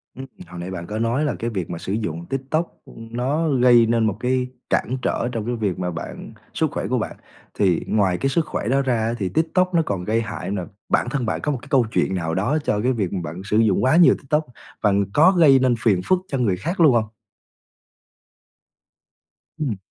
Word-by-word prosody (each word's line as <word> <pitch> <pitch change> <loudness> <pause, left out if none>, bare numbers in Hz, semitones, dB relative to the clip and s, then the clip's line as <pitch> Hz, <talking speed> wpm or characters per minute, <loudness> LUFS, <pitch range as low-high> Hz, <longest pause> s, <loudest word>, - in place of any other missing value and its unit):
Ừm, 130 - -7 0.2
hồi 90 +1 -9
nãy 90 +2 -5
bạn 85 -2 -6
có 105 +3 -4
nói 120 +6 0
là 150 - -1
cái 115 - -2
việc 95 -7 -4
mà 85 - -4
sử 95 - -4
dụng 85 -7 -3
TikTok, 135 - -3
ưm, 115 0 -12
nó 140 +7 0
gây 125 -3 +5
nên 115 0 +2
một 100 - -2
cái 125 +1 0 0.2
cản 130 - 0
trở 120 - -1
trong 115 -3 -4
cái 120 +1 -2
việc 105 -6 -2
mà 90 -1 -2
bạn 85 0 -7 0.2
sức - - 0
khỏe - - -3
của - - 0
bạn. - - -3 0.4
Thì 90 -5 +2
ngoài 95 -4 +1
cái 135 - 0
sức 160 +3 +1
khỏe 130 - -4
đó 135 +3 +2
ra 130 -3 0
á 110 +1 -1
thì 95 -4 -2
TikTok 180 - +1
nó 170 - +4
còn 95 -3 -3
gây 110 +4 0
hại 110 -3 -5
nà, 95 -3 -3 0.2
bản - - +1
thân 135 -2 -2
bạn 110 - -1
có 150 - -1
một 140 - -2
cái - - -13
câu 130 -5 +4
chuyện 95 - 0
nào 80 -3 -2
đó 115 +11 +1
cho 105 -7 0
cái 125 +3 +2
việc 100 -7 -2
mà 95 - -1
bạn 85 +4 -6
sử 105 +2 0
dụng 110 -4 +3
quá 130 +4 +4
nhiều 175 0 +7
TikTok 150 +3 -1 0.4
và 105 - +3 0.2
có 160 +5 +6
gây 155 -8 +6
nên 130 -2 +2
phiền 105 -5 +2
phức 185 - +3
cho 135 - -2
người 105 -8 +1
khác 170 - -4
luôn 155 -6 +6
hông? 110 -2 +2 2.5
Ừm. 130 -10 -2
115 Hz, 230 wpm, -22 LUFS, 100-135 Hz, 2.5 s, nhiều